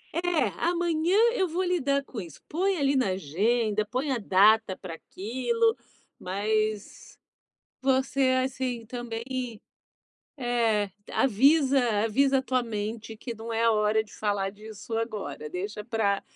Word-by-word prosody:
É, 350 -1 +1
amanhã 345 +1 +1 0.2
eu 380 -6 +1
vou 350 +3 -1
lidar 280 -6 +1
com 220 -6 -6
isso. 165 -5 -11
Põe 375 +3 0
ali 280 -1 +2
na 255 -7 +2
agenda. 210 +6 0
Põe 255 +6 -2
a 245 - 0
data 200 0 +4
pra 180 -4 -8
aquilo. 260 - -1 0.4
Mas 215 +2 -2 0.6
você, 265 +1 +1 0.2
assim, 250 -3 -3
também 235 -1 -5 1.2
É, 230 -5 +1 0.2
avisa 275 +3 +4 0.2
avisa 270 +4 +3
a - - -1
tua 255 -1 0
mente 220 0 -5
que 235 +1 -6
não 225 +1 -8
é 225 - +1
a 230 - +5
hora 215 +1 +2
de - - -19
falar 205 -2 -1
disso 215 +2 -11
agora. 200 -10 -4
Deixa 205 +5 -5
pra 210 -3 0
230 Hz, 135 wpm, -27 LUFS, 210-275 Hz, 1.2 s, a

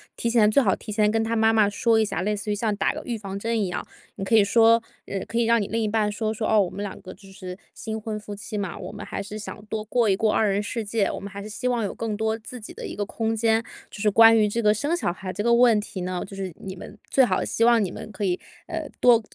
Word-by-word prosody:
提 235 - -1
前 225 -3 +5
最 275 +5 +4
好 195 -4 +3
提 210 - -7
前 210 -1 +3
跟 225 0 +1
他 225 +1 -1
妈 220 0 +4
妈 215 -2 +4
说 225 +2 +2
一 220 - +3
下， 175 - -3
类 210 +3 0
似 210 +1 -4
于 205 - +1
像 215 0 0
打 195 - +1
个 - - -6
预 235 -2 -3
防 195 -2 -6
针 225 +2 -1
一 200 - 0
样。 180 - -4 0.3
你 - - -5
可 195 - -2
以 215 -2 +6
说 230 +2 +5 0.3
呃， 195 - -3
可 230 - -4
以 235 - +3
让 230 0 +3
你 200 - -2
另 225 +1 -1
一 215 - 0
半 215 -1 +1
说， 215 +1 -2
说， 215 0 -2
哦， 215 -1 +5
我 185 - 0
们 200 - -7
两 205 - -5
个 185 - -9
就 195 - -16
是 185 -1 -8 0.2
新 220 0 -5
婚 215 0 -4
夫 210 -1 -8
妻 210 +1 -6
嘛， 200 -4 -3
我 - - -7
们 205 - -7
还 - - -4
是 205 +2 -7
想 210 0 -8
多 215 0 -4
过 225 +1 +1
一 195 - +4
过 215 +2 +2
二 215 -2 +3
人 200 +1 0
世 225 +1 -3
界， 205 -1 0
我 - - -5
们 200 - -7
还 200 0 -8
是 215 - -8
希 220 +4 -3
望 240 -2 +1
有 200 - -2
更 225 -2 -3
多 220 +1 -1
自 240 +2 -9
己 215 - -9
的 - - -8
一 - - -7
个 205 0 -2
空 225 +1 -2
间。 225 0 +2 0.3
就 - - -10
是 210 - +3
关 225 +2 +7
于 215 - +4
这 230 +3 -1
个 210 -1 +4
生 290 +10 0
小 345 - -1
孩 185 +1 -6
这 205 - -3
个 235 - +4
问 235 -3 +5
题 195 - -7
呢， 180 0 -3
就 195 - -12
是 190 -2 -5
你 190 -1 -7
们 205 - -10
最 265 - +5
好 - - 0
希 230 - +1
望 235 -2 +5
你 185 - -3
们 - - -8
可 210 - -5
以， 180 -2 0 0.3
呃， 325 -2 -4
多 240 -2 +6
215 Hz, 330 characters per minute, -24 LUFS, 200-225 Hz, 0.3 s, 关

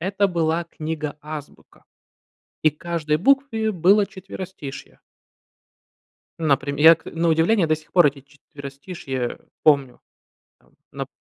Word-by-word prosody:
Это 195 +3 +1
была 170 -1 0
книга 155 -2 -5
"Азбука", 150 -1 -10 0.8
и 155 - +5
к 150 - -31
каждой 165 -3 -1
букве 225 - +2
было 195 +3 +4
четверостишье. 185 -7 -9 1.4
Наприм 140 -2 +1
я 160 +2 +9
к 160 - -20
на 165 +1 -1
удивление, 165 +4 +3
до 155 0 +2
сих 155 - -18
пор 175 -4 +6
эти 140 -1 -2
четверостишье 140 -2 -7 0.2
помню. 140 -5 +3 0.6
Там - - -30 0.2
нап - - -5
160 Hz, 125 wpm, -22 LUFS, 145-180 Hz, 1.4 s, я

